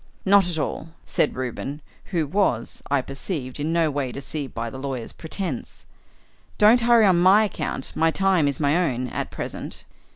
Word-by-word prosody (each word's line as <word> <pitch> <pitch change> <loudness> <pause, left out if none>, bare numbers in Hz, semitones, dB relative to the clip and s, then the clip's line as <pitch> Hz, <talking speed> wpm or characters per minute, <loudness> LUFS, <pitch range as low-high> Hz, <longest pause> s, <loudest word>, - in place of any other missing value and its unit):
"Not 195 -2 +5
at 170 - -4
all," 160 +1 -3 0.2
said - - +1
Reuben, 130 +3 -4 0.3
who 170 -5 -1
was, 145 - 0
I 140 -1 +2
perceived, 135 -1 -5
in 150 +3 -1
no 165 -2 +2
way 140 -3 -2
deceived 140 +1 -5
by 115 0 -4
the 130 - -7
lawyer's 130 -4 -4
pretence. 180 +3 -5 0.7
"Don't 220 +4 +6
hurry 235 -2 +5
on 185 -3 +4
my 195 +4 +6
account; 185 -9 -3
my 165 - +3
time 185 -3 +2
is 140 -2 -2
my 145 0 +2
own 130 -8 0
at - - -4
present." - - -6
155 Hz, 170 wpm, -24 LUFS, 135-190 Hz, 0.7 s, Don't